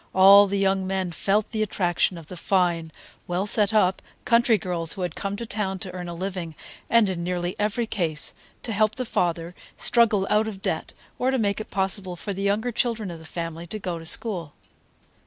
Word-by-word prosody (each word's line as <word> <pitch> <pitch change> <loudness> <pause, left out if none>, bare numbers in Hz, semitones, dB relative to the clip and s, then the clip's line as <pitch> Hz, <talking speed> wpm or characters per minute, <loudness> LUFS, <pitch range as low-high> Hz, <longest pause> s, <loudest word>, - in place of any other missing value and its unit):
All 200 +2 +8
the 200 +1 -1
young 195 -1 +1
men 190 -2 -1
felt 205 +5 0
the 220 -2 -1
attraction 180 -3 +1
of 165 - -10
the 180 - -9
fine, 170 -2 0 0.4
well 180 +2 -1
set 210 0 +2
up 190 -4 +2 0.2
country 235 -1 +4
girls 170 -3 0
who 185 - -4
had 175 -3 -2
come 200 0 -3
to 235 +3 -5
town 200 -3 -2
to 185 0 -5
earn 180 -1 -6
a 170 - -6
living, 180 -3 -4 0.3
and, 230 -3 +5
in 180 -3 -3
nearly 175 0 -2
every 215 +3 0
case, 165 -8 -2 0.3
to 230 - -3
help 215 +1 +2
the 255 - -3
father 170 -4 -1 0.2
struggle 220 -5 +4
out 215 +1 +2
of 205 -3 -6
debt, - - -2 0.3
or 255 - +2
to 265 - +1
make 205 -2 0
it - - -9
possible 190 -1 -2
for 200 +4 -5
the 195 - -5
younger 210 +5 0
children 225 -4 -1
of 165 - -8
the 160 - -13
family 165 0 -5
to 215 - -5
go 180 -4 -4
to 165 - -10
school. 175 -7 -1
190 Hz, 210 wpm, -25 LUFS, 175-215 Hz, 0.4 s, All